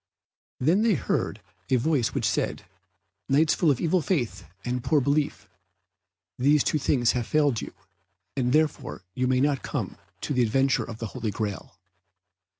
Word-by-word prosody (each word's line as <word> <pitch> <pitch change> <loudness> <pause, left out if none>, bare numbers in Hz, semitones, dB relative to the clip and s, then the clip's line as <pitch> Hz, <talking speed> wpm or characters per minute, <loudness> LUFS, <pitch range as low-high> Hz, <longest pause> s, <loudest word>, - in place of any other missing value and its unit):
Then 165 +10 +3
they 225 -3 +3
heard - - -2 0.3
a 130 - +4
voice 125 -2 +1
which - - +1
said, - - -1 0.6
"Knights 150 +3 +4
full 165 - +2
of 135 -4 +2
evil 175 +2 +2
faith 120 - -1 0.2
and 125 0 -2
poor 155 +1 +3
belief, 145 +2 0 0.9
these 145 +3 +4
two 155 - +1
things 125 -4 +2
have 120 -2 -2
failed 145 -6 +2
you, - - -7 0.6
and 125 -2 0
therefore 150 -8 0
you 125 +4 0
may 130 0 +2
not 140 -1 +1
come 115 -10 -4 0.2
to - - -2
the 125 - +2
adventure 135 +4 +2
of 115 -2 -8
the 115 - -4
Holy 120 -4 -3
Graal." 105 -1 -5
135 Hz, 160 wpm, -26 LUFS, 120-150 Hz, 0.9 s, a